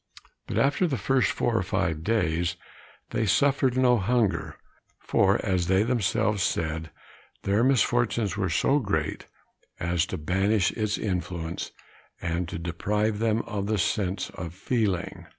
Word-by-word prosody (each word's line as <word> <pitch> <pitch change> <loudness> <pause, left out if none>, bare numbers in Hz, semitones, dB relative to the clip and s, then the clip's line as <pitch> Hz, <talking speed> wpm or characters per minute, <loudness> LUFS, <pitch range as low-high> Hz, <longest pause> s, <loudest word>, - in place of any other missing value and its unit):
But - - -3
after 145 +6 +3
the 135 -5 -1
first 130 -9 +2
four - - 0
or - - +3
five 80 -1 -1
days, 85 -5 +1 0.6
they 110 -1 0
suffered 130 +5 +2
no 125 -2 +4
hunger, 115 +1 0 0.4
for, 100 +2 +2
as 90 -4 +1
they 95 +2 +3
themselves 105 -3 +1
said, 80 -3 -1 0.5
their 100 +4 +2
misfortunes 120 -6 +2
were 95 -2 -1
so 140 - +2
great 80 - -2 0.5
as 85 0 0
to 95 - -4
banish 95 +5 +1
its 105 -1 -1
influence, 90 -4 -3 0.5
and 85 0 -2
to - - -4
deprive 105 +6 -1
them 115 0 +1
of 100 -2 -4
the 110 0 +1
sense 95 0 -1
of 85 0 -7
feeling. 100 -3 -1
100 Hz, 140 wpm, -26 LUFS, 85-115 Hz, 0.6 s, no